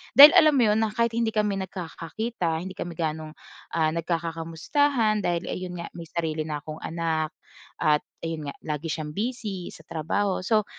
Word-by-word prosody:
Dahil 290 +2 +13
alam 310 -5 +7
mo 255 - +5
'yon, 215 0 +3
na 220 -1 +2
kahit 235 0 +2
hindi 230 0 +1
kami 210 -2 +1
nagkakakita, 180 +1 -3
hindi 190 0 -6
kami 175 -2 -6
gano'ng, 155 -1 -3 0.4
ah 160 -1 +3
nagkaka-kamustahan 170 - 0
dahil 175 -2 0
ayun 180 -1 -4
nga - - -6
may 170 -1 -9
sarili 155 -1 -2
na 150 -1 -4
akong 155 0 -7
anak. 160 -1 -2 0.4
At 150 -1 +3 0.2
ayun 160 -3 -3
nga, - - -15
lagi 155 +1 -3
siyang 150 -1 -4
busy 210 -5 -3
sa - - -13
trabaho. 185 +5 -1
So 215 0 +3
170 Hz, 170 wpm, -26 LUFS, 160-215 Hz, 0.4 s, Dahil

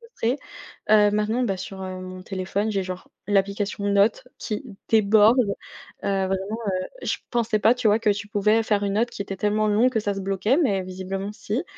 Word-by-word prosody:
frustrée. 370 - -2 0.5
Heu, 210 -1 +6
maintenant, 215 +4 +1
bah, 195 -5 -1
sur, 190 +1 -7
heu, 185 0 -5
mon 185 0 -8
téléphone 190 +2 -2
j'ai 195 -1 0
genre 185 0 -7 0.2
l'application 200 0 0
notes 200 +4 +2
qui 215 +4 -4 0.2
déborde, 220 +2 +5 0.7
heu, 195 -1 +1
vraiment, 190 - 0 0.7
heu, - - -7
je - - +1
pensais 230 -3 +1
pas, 220 +3 +5
tu 250 -2 0
vois, 210 +1 +4
que 225 -2 +2
tu 205 0 -1
pouvais 210 +1 +2
faire 210 -2 +1
une 200 -1 0
note 230 +4 +1
qui - - -5
était 195 -1 -5
tellement 210 +2 +1
longue 215 +4 +4
que 220 - 0
ça 205 -1 -1
se 195 - -5
bloquait 195 +6 +1
mais 200 - +1
visiblement 190 +2 -5
si. 215 - -3
205 Hz, 200 wpm, -24 LUFS, 195-220 Hz, 0.7 s, Heu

